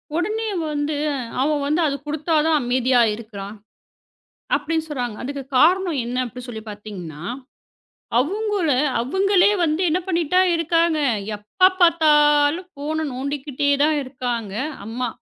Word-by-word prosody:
உடனே 430 +6 -1 0.2
வந்து 295 0 -2 0.5
அவன் 295 +1 +1
வந்து 305 +4 +1
"அதக் 280 0 -4
கொடுத்தாதான் 310 +1 +1
அமைதியா 250 0 +2
இருக்குறான்" 210 -2 -8 1.0
அப்படின்னு 320 -1 -2
சொல்றாங்க. 245 -7 -3
அதுக்கு 275 +2 -5
காரணம் 345 +1 +3
என்ன 245 +1 -4
அப்படின்னு 250 +1 -9
சொல்லிப் 220 -2 -8
பார்த்தீங்கன்னா. 190 -7 -8 1.0
அவுங்கள 400 - 0 0.3
அவங்களே 385 +9 +3
வந்து 315 +1 +1
என்ன 335 +4 +1
பண்ணிட்டே 345 0 +2
இருக்காங்க. 330 -1 +1 0.4
எப்ப 215 - +3
பார்த்தாலும் 300 0 +4
ஃபோனு 310 +2 -3
நோண்டிக்கிட்டே 280 +1 -2
தான் 305 0 +2
இருக்காங்க 245 -5 -4 0.3
அம்மா. 240 +3 -3
295 Hz, 115 wpm, -22 LUFS, 250-330 Hz, 1.0 s, பார்த்தாலும்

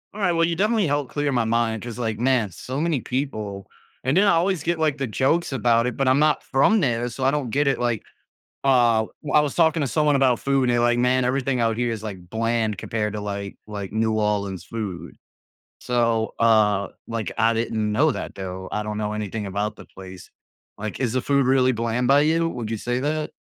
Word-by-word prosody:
Alright. 195 -4 +1
Well, 165 0 +3
you 170 - -1
definitely 210 0 +2
helped 145 -2 -1
clear 145 -1 -1
my 120 -3 +1
mind 115 -1 0
‘cause, 120 0 -7
like, 110 -3 -2
man, 120 -5 +1
so 130 - -5
many 160 -6 0
people 110 -7 -4 0.4
and 130 +5 +1
then 195 - +5
I 200 - +5
always 170 -1 +1
get, 170 0 -1
like, 155 -3 +1
the 135 - -1
jokes 140 +9 +1
about 120 -2 +2
it, 125 -2 -3
but 135 - +1
I'm 130 +2 +4
not 155 0 +3
from 175 +11 +3
there, 120 -5 0
so 130 +3 -4
I 135 - +4
don't 145 -5 -2
get 140 +5 +1
it. 135 - +2
Like, 120 -3 -1 0.6
uh, 120 -4 +4 0.2
w 150 - -4
I 150 - +7
was 145 -2 -1
talking 160 -2 +3
to - - 0
someone 150 +1 +2
about 130 -3 +2
food, 135 -2 +1
they're 120 0 +2
like, 120 0 +2
"Man, 125 +1 +2
everything 130 0 0
out 115 -1 +1
here 120 -1 0
is, 110 - -5
like, 95 -5 -8
bland 115 0 0
compared 105 0 -2
to, 105 - -4
like 100 -1 -5
like, 100 -2 -6
New 110 0 +1
Orleans 100 -4 -1
food." 105 -4 -6 0.7
So, 115 -2 0
uh, 105 -3 +3 0.2
like, 115 -2 -3
I 115 +1 +3
didn't 110 -2 -1
know 150 +9 +3
that, - - -6
though, 95 -1 -6
I 105 - -2
don't 105 0 -4
know 105 0 -2
anything 105 0 -4
about 100 +2 -2
the - - -13
place. 95 -1 -12 0.5
Like, 110 0 -5
is 120 -3 0
the 130 - +1
food 140 0 +2
really 130 -1 +3
bland 115 +2 -1
by 140 +2 +5
you? 165 +2 +2
Would 120 -8 -5
you 115 - -2
say 120 +3 -2
that? 155 +1 -2
120 Hz, 225 wpm, -23 LUFS, 110-140 Hz, 0.7 s, I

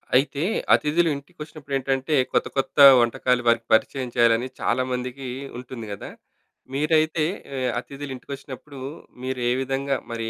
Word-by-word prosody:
అయితే, 140 +2 +2 0.3
అతిథులు 165 +3 +3
ఇంటికొచ్చినప్పుడేంటంటే 140 -2 -3 0.2
కొత్త - - +1
కొత్త 135 - -1 0.2
వంటకాలు 125 +1 +1
వారికి 115 0 +3
పరిచయం 125 +3 +1
చేయాలని 120 0 +3
చాలామందికి 130 +1 -2 0.3
ఉంటుంది 125 -3 -8
కదా! - - -8 0.6
మీరైతే 155 +2 +2 0.3
ఆహ్, 130 -1 0
అతిథులు 140 0 -8
ఇంటికొచ్చినప్పుడు 135 +2 -9 0.4
మీరే 130 -2 -1
విధంగా 135 +1 -1
మరి, 115 -1 -3
135 Hz, 110 wpm, -24 LUFS, 125-140 Hz, 0.6 s, అతిథులు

